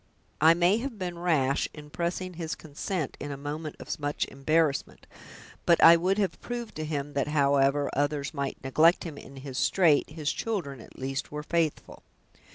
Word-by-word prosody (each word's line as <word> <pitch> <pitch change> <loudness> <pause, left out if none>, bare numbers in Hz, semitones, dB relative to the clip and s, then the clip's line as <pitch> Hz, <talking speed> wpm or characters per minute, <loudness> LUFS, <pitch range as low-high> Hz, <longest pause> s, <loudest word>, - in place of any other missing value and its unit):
"I 160 +2 +7
may 175 +4 +3
have 250 -2 -5
been 175 -3 -4
rash 145 -6 +1
in 150 -1 -11
pressing 175 +2 -3
his 165 -2 -4
consent 155 +1 -4
in 145 - -5
a 140 - -5
moment 150 +2 -5
of - - -5
much 145 0 -1
embarrassment, 150 +1 0 0.6
but 170 - +4
I 165 - +10
would 185 +4 +1
have 195 -5 -1
proved 240 -2 -5
to 155 - -3
him, 145 -1 -3
that 140 0 0
however 140 -1 +3
others 145 +1 -1
might 140 -2 -3
neglect 155 +6 +4
him 155 -4 -7
in 140 - -12
his 135 -1 -6
strait 170 -6 +3
his 155 -1 -2
children 160 - -3
at - - -15
least 135 +1 -4
were 150 0 -5
faithful." 165 -1 -2
155 Hz, 175 wpm, -28 LUFS, 140-170 Hz, 0.6 s, I